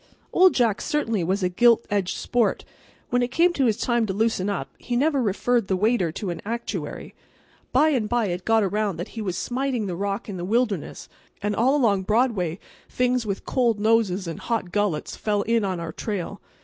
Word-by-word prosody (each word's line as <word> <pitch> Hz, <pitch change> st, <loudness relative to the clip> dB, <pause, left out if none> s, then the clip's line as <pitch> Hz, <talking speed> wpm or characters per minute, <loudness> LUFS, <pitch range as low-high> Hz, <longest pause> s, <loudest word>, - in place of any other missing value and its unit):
Old 370 Hz, 0 st, +6 dB
Jack 230 Hz, -5 st, +2 dB
certainly 230 Hz, -, 0 dB
was 190 Hz, +3 st, 0 dB
a -, -, +3 dB
gild 235 Hz, +5 st, +4 dB
edged 200 Hz, -3 st, 0 dB
sport. 240 Hz, -2 st, 0 dB, 0.5 s
When 245 Hz, 0 st, +2 dB
it 245 Hz, -, +1 dB
came 335 Hz, +7 st, +3 dB
his 245 Hz, -9 st, +2 dB
time 235 Hz, -2 st, +1 dB
to 190 Hz, -, -2 dB
loosen 205 Hz, -2 st, 0 dB
up 200 Hz, -, -3 dB
he 245 Hz, -, -3 dB
never 280 Hz, +2 st, +2 dB
referred 230 Hz, +1 st, +1 dB
the 190 Hz, -, +1 dB
waiter 200 Hz, -3 st, +1 dB
to 190 Hz, 0 st, -3 dB
an 170 Hz, -, -6 dB
actuary. 235 Hz, +3 st, -5 dB, 0.6 s
By 295 Hz, +5 st, +4 dB
and 240 Hz, -8 st, 0 dB
by 240 Hz, -2 st, +1 dB
it 175 Hz, +1 st, -3 dB
got 225 Hz, +1 st, +3 dB
around 200 Hz, -2 st, -1 dB
that 175 Hz, +4 st, -5 dB
he 225 Hz, -, -6 dB
was 185 Hz, -4 st, -3 dB
smiting 250 Hz, +1 st, -1 dB
the 180 Hz, -3 st, -3 dB
rock 200 Hz, +5 st, -3 dB
in 200 Hz, -3 st, -5 dB
the 175 Hz, -, -5 dB
wilderness; 215 Hz, -3 st, -1 dB, 0.4 s
and 205 Hz, 0 st, 0 dB
all 260 Hz, +5 st, +3 dB
along 215 Hz, -9 st, +3 dB
Broadway 210 Hz, -5 st, +1 dB, 0.3 s
things 250 Hz, -2 st, 0 dB
with 200 Hz, -1 st, -3 dB
cold 235 Hz, -5 st, +1 dB
noses 210 Hz, -4 st, +2 dB
and 165 Hz, -1 st, -5 dB
hot 225 Hz, -7 st, -2 dB
gullets 205 Hz, -6 st, -1 dB
fell 205 Hz, -1 st, 0 dB
in 230 Hz, 0 st, +1 dB
on 185 Hz, -3 st, -2 dB
our 165 Hz, -1 st, -5 dB
trail. 200 Hz, +1 st, -4 dB
215 Hz, 200 wpm, -24 LUFS, 195-240 Hz, 0.6 s, Old